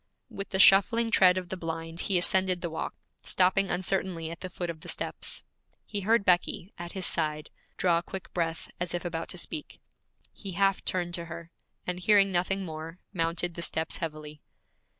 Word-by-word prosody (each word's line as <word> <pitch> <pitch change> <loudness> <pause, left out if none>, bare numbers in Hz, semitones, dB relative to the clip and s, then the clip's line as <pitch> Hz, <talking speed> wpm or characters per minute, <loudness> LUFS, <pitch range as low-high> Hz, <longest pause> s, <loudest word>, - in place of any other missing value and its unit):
With 195 - -5
the 190 - 0
shuffling 225 +4 +6
tread 185 -5 +6
of 180 -1 -4
the 190 - -3
blind 165 0 -4
he 190 0 +2
ascended 185 0 +2
the 170 - -3
walk, 160 - -4 0.3
stopping 190 +1 +3
uncertainly 180 -3 -1
at 170 - -8
the 185 - -6
foot 175 -1 -3
of 160 -2 -12
the - - -9
steps. - - -3 0.4
He 205 -2 -3
heard 215 +1 +3
Becky, 180 +1 +2
at 175 0 -7
his 190 -2 -1
side, 155 -2 0 0.3
draw 170 -2 +3
a - - -6
quick 190 +1 -8
breath, 165 -2 -2
as 175 0 -2
if 175 - -4
about 165 -1 -3
to - - -6
speak. 300 - -4 0.5
He 195 -3 -7
half 195 +2 +2
turned 175 -1 +1
to 170 -1 -2
her, 170 0 -8 0.3
and 180 0 -3
hearing 195 +1 +5
nothing 190 +2 +1
more, 160 +1 -7 0.2
mounted 170 0 0
the 170 - -6
steps 160 -1 -1
heavily. 155 -2 -6
175 Hz, 190 wpm, -29 LUFS, 165-190 Hz, 0.5 s, shuffling